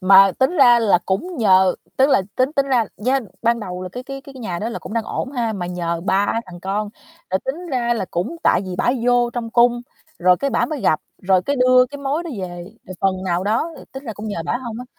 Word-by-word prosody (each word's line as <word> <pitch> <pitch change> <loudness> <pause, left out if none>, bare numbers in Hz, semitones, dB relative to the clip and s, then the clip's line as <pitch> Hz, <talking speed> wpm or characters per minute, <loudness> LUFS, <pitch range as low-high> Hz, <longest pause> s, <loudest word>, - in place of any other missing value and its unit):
Mà 195 0 +7
tính 265 +7 +2
ra 245 -4 +7
là 210 -6 +4
cũng 335 - -2
nhờ 190 -5 +4 0.2
tức 265 +1 +4
là 235 - +4
tính 255 +3 +1
tính 275 -2 +1
ra 250 -4 +2
dên 255 -1 0
ban 235 0 +2
đầu 180 -3 -6
là 185 - -5
cái 250 - -6
cái 275 +1 -7
cái 275 0 -13
cái 260 - -10
nhà 180 -7 -4
đó 215 - -3
là 235 - -5
cũng - - -9
đang 230 -1 -1
ổn 260 - -4
ha? 235 -4 -1
Mà 185 -4 -4
nhờ 170 -1 -3
3 195 +1 +2 0.2
thằng 175 -1 -11
con, 200 +3 -2 0.4
là 190 - +1
tính 320 +7 -4
ra 240 -3 +1
là 225 - -2
cũng 180 - -2
tại - - +4
vì 185 -1 -5
bả 240 - +2
vô 245 -1 +3
trong 230 -1 -4
cung 240 +1 +3 0.4
rồi 180 +1 +4
cái 280 +6 -1
bả 235 - +1
mới 305 -3 -4
gặp, 155 - +2 0.2
rồi 185 -1 +3
cái 280 +7 -1
đưa 255 0 +5
cái 285 +2 -9
mối 280 +4 -1
đó 340 - -6
về, 185 - -4 0.4
rồi 185 - -8
phần 185 -1 0
nào 180 0 0
đó, 230 +11 0
ư, - - -12
tính 265 +1 -8
ra 230 - -4
cũng 215 +1 -7
nhờ 170 -5 -3
bả 240 - 0
hông 235 -3 -6
á. 250 - -7
230 Hz, 265 wpm, -20 LUFS, 190-260 Hz, 0.4 s, Mà